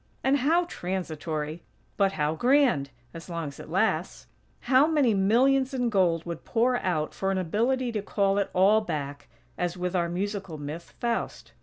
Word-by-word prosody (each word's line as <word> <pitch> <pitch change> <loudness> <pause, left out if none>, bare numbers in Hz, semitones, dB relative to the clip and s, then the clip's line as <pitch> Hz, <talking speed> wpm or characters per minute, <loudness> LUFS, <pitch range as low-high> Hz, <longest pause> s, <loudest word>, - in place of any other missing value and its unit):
And 270 +2 +3
how 325 +7 +2
transitory! 165 - -4 0.3
But, 195 -1 +2
how 150 -2 0
grand! 245 - +3 0.2
as 165 +2 -10
long 165 -3 -3
as 140 - -13
it - - -10
lasts. - - 0 0.4
How 270 +3 +4
many 290 -8 +3
millions 260 +7 +3
in 245 -2 0
gold 175 -5 +2
would 170 -2 -6
pour 245 +2 +1
out 165 -8 -1
for 195 - -2
an 195 - 0
ability 235 +8 0
to 215 -2 -2
call 200 -1 +1
it 200 - -1
all 200 +4 +4
back, 145 -7 -5 0.3
as 175 0 -1
with 180 +1 -2
our 170 -1 +1
musical 195 -2 -3
myth, 150 +4 -8
Faust. 235 -1 -3
195 Hz, 170 wpm, -27 LUFS, 170-245 Hz, 0.4 s, How